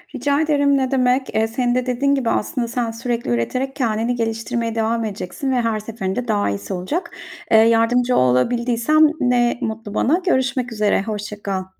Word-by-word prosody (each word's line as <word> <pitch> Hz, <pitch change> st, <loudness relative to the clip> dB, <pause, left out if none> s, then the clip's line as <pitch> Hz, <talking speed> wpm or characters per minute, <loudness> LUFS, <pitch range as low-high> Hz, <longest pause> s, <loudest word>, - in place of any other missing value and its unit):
Rica 285 Hz, +1 st, +1 dB
ederim 285 Hz, -2 st, +2 dB
ne 260 Hz, -1 st, -1 dB
demek. 255 Hz, -1 st, +1 dB
Eee, 220 Hz, 0 st, +2 dB
senin 245 Hz, +2 st, -1 dB
de 255 Hz, 0 st, 0 dB
dediğin 275 Hz, +3 st, +1 dB
gibi 255 Hz, -4 st, -1 dB
aslında 235 Hz, +2 st, -1 dB
sen 235 Hz, -1 st, -2 dB
sürekli 235 Hz, +1 st, -3 dB
üreterek 255 Hz, -, -1 dB
kendini 230 Hz, -1 st, 0 dB
geliştirmeye 230 Hz, 0 st, -2 dB
devam 225 Hz, 0 st, 0 dB
edeceksin 210 Hz, +6 st, -4 dB
ve 250 Hz, -2 st, +1 dB
her 225 Hz, -2 st, -1 dB
seferinde 215 Hz, +1 st, -4 dB
daha 205 Hz, -, +1 dB
iyisi 100 Hz, 0 st, -4 dB
olacak. 235 Hz, -, -3 dB, 0.4 s
Eee, 220 Hz, -, +7 dB
yardımcı 230 Hz, +2 st, +3 dB
olabildiysem 235 Hz, -, +3 dB
ne 245 Hz, -2 st, +2 dB
mutlu 220 Hz, -3 st, -4 dB
bana. 325 Hz, +12 st, +2 dB
Görüşmek 260 Hz, -6 st, 0 dB
üzere, 210 Hz, -3 st, +1 dB
hoşça 210 Hz, -1 st, -6 dB
kal. 190 Hz, -2 st, -2 dB
235 Hz, 170 wpm, -20 LUFS, 220-255 Hz, 0.4 s, Eee